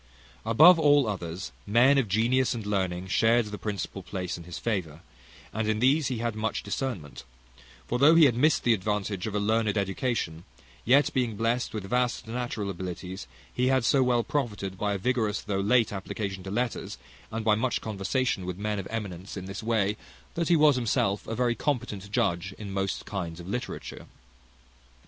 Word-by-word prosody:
Above 160 +10 +7
all 145 -3 +5
others, 90 -3 -4 0.2
men 125 +6 +5
of 125 - 0
genius 120 +6 +2
and 110 -3 -5
learning 95 -3 -1
shared 115 +4 +3
the 105 0 -6
principal 100 -2 -4
place 90 -1 -4
in 85 - -10
his 90 - -7
favour; 85 -9 -3 0.5
and 110 0 -1
in 110 - +1
these 135 +5 +3
he 125 - -2
had 115 0 -2
much 110 +1 -2
discernment: 100 - -4 0.6
for 120 - -1
though 150 +5 +7
he 165 -2 +8
had 130 - +4
missed 145 +6 +2
the 120 - +4
advantage 105 -1 -2
of 105 - -4
a - - +2
learned 110 0 +1
education, 95 -4 -2 0.4
yet, 135 +5 +4
being 125 -5 0
blest 115 +3 0
with 110 -3 -4
vast 125 +4 0
natural 115 -4 -3
abilities, 90 -4 -6 0.3
he 125 +1 +1
had 130 -2 +2
so 135 - +4
well 125 -2 +2
profited 105 -10 -3
by 100 +2 -1
a - - -1
vigorous 110 -1 0
though 100 -1 -2
late 110 +2 +3
application 95 0 -4
to 95 - -7
letters, 120 +4 -2 0.3
and 110 0 -4
by 110 - +5
much 120 +4 0
conversation 110 +1 -1
with 90 -1 -4
men 105 0 -2
of 95 - -5
eminence 100 -4 -5
in 95 - -6
this 95 +3 -6
way, 110 -2 0 0.4
that 170 0 -1
he 175 - +6
was 150 -3 +5
himself 100 -4 0
a 115 - -3
very 120 -1 +1
competent 115 -7 -3
judge 90 -1 0
in 105 -2 -7
most 95 0 -2
kinds 85 -4 -5
of 85 - -9
literature. 120 +4 -5
110 Hz, 185 wpm, -27 LUFS, 95-125 Hz, 0.6 s, he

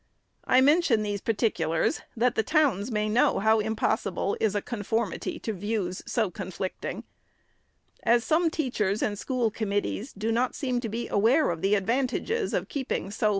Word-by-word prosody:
I 255 - +5
mention 285 -6 +4
these 205 -1 -3
particulars, 200 - 0 0.2
that 240 +2 +3
the - - +2
towns 265 - +1
may 210 -2 0
know 220 +3 +3
how 220 +2 +3
impossible 210 -3 -1
is 210 -2 +1
a 205 - +1
conformity 225 -2 -2
to 220 - -4
views 200 -2 -3
so 220 -6 0
conflicting. 185 +1 -5 1.0
As 235 0 +3
some 325 +4 +2
teachers 220 -10 -1
and 205 - 0
school 245 -4 0
committees 205 +3 -2
do 215 +3 -2
not 240 +2 0
seem 255 -4 -1
to 235 -2 -4
be 230 +3 -3
aware 230 - +3
of 165 -1 -5
the 200 +2 +3
advantages 255 - 0
of - - -1
keeping 280 - -3
so - - -7
SECOND - - 0
ANNUAL 205 +3 -2
REPORT. - - +4
220 Hz, 175 wpm, -27 LUFS, 205-250 Hz, 1.0 s, I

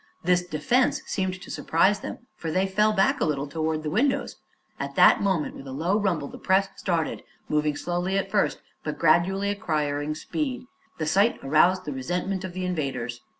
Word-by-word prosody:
This 180 +1 +3
defense 180 - +1
seemed 185 -2 -2
to - - -9
surprise 195 +5 +2
them, 240 - -8
for 165 - -5
they 185 +4 +1
fell 210 +3 +2
back 245 +7 +2
a - - +4
little 145 -2 0
toward 155 +1 -2
the 150 - -3
windows. 275 - 0 0.4
At - - -4
that - - +6
moment, 190 -6 0
with 135 - -10
a - - -6
low 170 +10 0
rumble, 175 -8 0
the - - -10
press 190 +1 +2
started, 170 -4 -1 0.3
moving 150 -1 +1
slowly 175 +4 -1
at 195 0 -2
first 210 - +1 0.2
but 150 - -4
gradually 190 +5 +3
acquiring 150 -7 -1
speed. 255 - -3 0.3
The 155 - -2
sight 200 +9 +3
aroused 175 +6 +3
the 150 - -3
resentment 180 +8 -2
of 185 -2 -5
the 185 0 -3
invaders. 130 -9 -3
180 Hz, 185 wpm, -26 LUFS, 155-195 Hz, 0.4 s, that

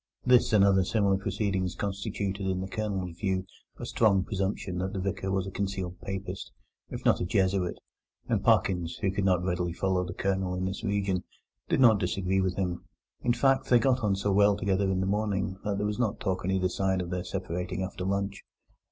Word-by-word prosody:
This 125 -1 +5
and 105 -3 +5
other 95 -1 +4
similar 100 0 +2
proceedings 95 -2 -1
constituted 100 -1 -3
in 95 -1 0
the 95 - -3
Colonel's 95 -5 -3
view 95 -2 0 0.3
a - - -6
strong 100 -4 +3
presumption 95 -2 -2
that 95 +1 -2
the 95 - -2
Vicar 95 0 -2
was 95 -1 0
a 95 - -6
concealed 95 -2 -3
Papist, 95 -1 -5 0.4
if - - -7
not - - +4
a - - +1
Jesuit; 95 0 +1 0.5
and - - 0
Parkins, 90 -3 +2
who 95 - +1
could 95 0 -1
not 90 -2 +3
very 95 - 0
readily 90 -1 -1
follow 95 +1 0
the 90 0 -6
Colonel 95 -2 -1
in 90 0 -2
this 95 +3 -4
region, 100 -3 0 0.5
did - - +2
not 110 -5 +7
disagree 95 0 0
with 95 -1 0
him. 90 -3 -2 0.4
In 120 - +2
fact, 135 +1 +2
they 125 - +7
got 130 +2 +3
on 105 -5 +1
so 100 +1 0
well 100 +1 +4
together 100 -1 +1
in 95 -1 0
the - - 0
morning 100 -2 -1
that 105 -2 -1
there 105 - -1
was 105 +2 -2
no 110 -4 +1
talk 95 -4 -2
on 90 - -1
either 95 -1 +2
side 95 +1 0
of 90 -1 -4
their 90 0 -2
separating 90 0 -3
after 95 -1 -5
lunch. 100 +1 -2
95 Hz, 210 wpm, -28 LUFS, 95-100 Hz, 0.5 s, not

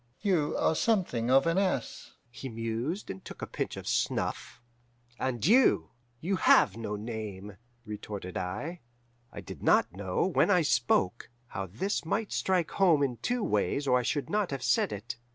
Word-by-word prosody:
"'You 180 -8 +1
are - - +2
something 160 - +1
of 135 +3 +5
an 165 +3 +2
ass,' 185 -11 -2 0.2
he 130 +2 -7
mused, 115 - -3
and 95 - -9
took - - -9
a - - 0
pinch - - -4
of - - -8
snuff. - - -1 0.6
"'And 125 -3 -1
you 240 +8 +4 0.3
you 185 +6 -1
have - - +5
no 110 -2 -4
name,' 105 -2 -6 0.3
retorted 105 -3 -6
I. 105 - -4 0.5
"I - - -8
did - - -10
not - - +3
know, 95 - -1
when 190 - +2
I 180 -4 +4
spoke, 120 -7 +1 0.2
how 95 0 -4
this 130 - -2
might 205 +6 -2
strike 180 -4 0
home 170 -7 +4
in 125 -4 -1
two 245 - -1
ways 105 - 0
or 125 -1 +4
I - - 0
should 145 +4 -1
not 210 -2 0
have 135 -2 -4
said 120 -3 +2
it. 105 +4 -6
130 Hz, 170 wpm, -29 LUFS, 105-180 Hz, 0.6 s, of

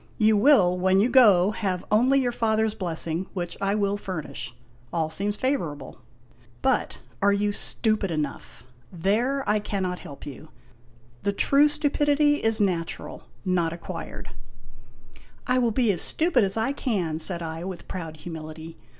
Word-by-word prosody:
You 215 0 +4
will, 200 -7 +4
when 190 +1 +3
you 220 +5 +3
go, 205 -7 +6
have 190 -4 -3
only 255 +6 +4
your 250 -2 0
father's 220 -2 +1
blessing 170 -1 -3
which 175 -2 -3
I 200 +1 +1
will 200 -1 0
furnish. 155 - -6 0.4
All 160 -2 -1
seems 205 +5 -2
favorable. 170 - -3 0.6
But - - +1 0.2
are 200 +1 +4
you 205 +1 +1
stupid 215 -1 -1
H4 165 - -2
IMAGINOTIONS - - 0
enough? 145 -2 -6 0.3
There 230 +10 0
I 210 +1 +2
cannot 190 -3 -3
help 140 - -11
you. 150 +2 -10 0.7
The 200 - 0
true 280 +8 +4
stupidity 290 0 +2
is 225 0 +2
natural, 180 -5 -2 0.2
not 175 -3 +1
acquired." 170 - -7 0.6
" 120 +1 -23 0.3
I 250 0 +2
will 240 -2 +2
be 230 0 +2
as 180 - -1
stupid 315 -8 +2
as 195 +2 -1
I 225 +4 +1
can," 190 - -2
said 170 +1 0
I, 160 +1 -5
with 185 -1 -7
proud 165 -4 -6
humility. 160 0 -8
195 Hz, 160 wpm, -25 LUFS, 170-225 Hz, 0.7 s, go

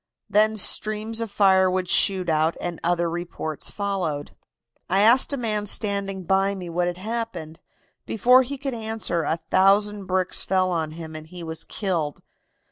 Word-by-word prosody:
Then 215 +1 +2
streams 215 +2 0
of 230 - -3
fire 190 -2 +4
would 185 0 -1
shoot 185 0 +2
out, 160 0 +1
and 175 -2 -5
other 175 0 +1
reports 165 -2 -5
followed. 185 -8 -3 0.6
"I 190 +2 +3
asked 235 +7 +5
a 280 - 0
man 215 -4 -2
standing 200 -2 +1
by 195 +2 +1
me 180 -3 -7
what 175 +1 0
had 175 0 -3
happened. 195 -6 -5 0.5
Before 250 +4 +5
he 270 +2 -5
could 275 0 -4
answer 220 -6 -2
a 160 +1 -1
thousand 200 +1 +3
bricks 185 0 0
fell 185 -1 +1
on 160 -3 -2
him 160 -1 -9
and 155 0 -8
he 175 +1 -9
was 160 -1 -3
killed. 170 -8 -3
190 Hz, 165 wpm, -24 LUFS, 170-210 Hz, 0.6 s, asked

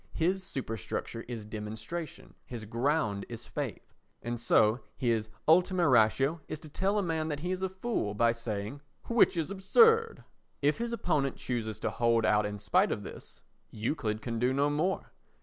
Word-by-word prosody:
His 185 +4 +1
superstructure 115 - -4
is 115 -3 -6
demonstration, 110 +10 -6
his 115 -3 -7
ground 115 -2 0
is - - -7
faith. - - -5 0.3
And 120 0 -3
so 110 -1 +4 0.2
his 115 -3 0 0.2
ultima 180 +2 +4
ratio 135 +6 +3
is 155 - -5
to 155 - -10
tell 195 +7 0
a 205 - +2
man 160 -2 -1
that 145 -2 -3
he 180 +2 -2
is 185 0 -2
a 190 - 0
fool 190 - -2
by 115 +2 +4
saying 115 +2 -4 0.3
"Which 230 -6 +4
is 165 +3 -1
absurd." 455 - +4 0.4
If 145 +6 +2
his 235 0 -2
opponent 145 - 0
chooses 110 -4 -3
to - - -1
hold 115 -1 +2
out 105 -1 +3
in 105 0 -5
spite - - +2
of - - -2
this, - - -11 0.3
Euclid 110 -1 -2
can 115 -2 -3
do 125 +2 +2
no 140 +2 +2
more. 165 +6 -1
135 Hz, 170 wpm, -30 LUFS, 110-175 Hz, 0.4 s, so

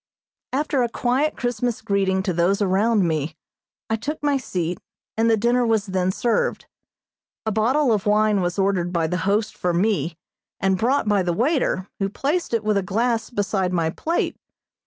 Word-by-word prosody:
After 280 0 0
a 240 - +1
quiet 255 +6 0
Christmas 245 -1 -1
greeting 195 -3 0
to 190 -2 -1
those 175 +4 +2
around 200 0 +2
me, 155 -1 -2 0.5
I 225 - 0
took 300 +7 -4
my 290 -1 +2
seat, 180 -9 -2 0.4
and 225 +1 +2
the 225 - +4
dinner 240 +3 +2
was 225 -3 +1
then 185 -2 0
served. 245 - 0 0.8
A 220 - 0
bottle 240 +5 +2
of 210 0 -1
wine 210 -1 +3
was 175 +1 -2
ordered 190 -3 +1
by 170 -2 +1
the 180 +3 -1
host 210 +1 0
for 180 -1 -1
me, 180 -3 0 0.4
and 190 0 +2
brought 250 +2 +1
by 205 -2 +3
the 175 -1 0
waiter, 240 - 0
who 195 -1 0
placed 295 - -1
it 230 -2 0
with 215 -1 +1
a - - +2
glass 225 +4 0
beside 200 -4 -1
my 165 -2 +1
plate. 330 - -1
210 Hz, 180 wpm, -23 LUFS, 185-240 Hz, 0.8 s, the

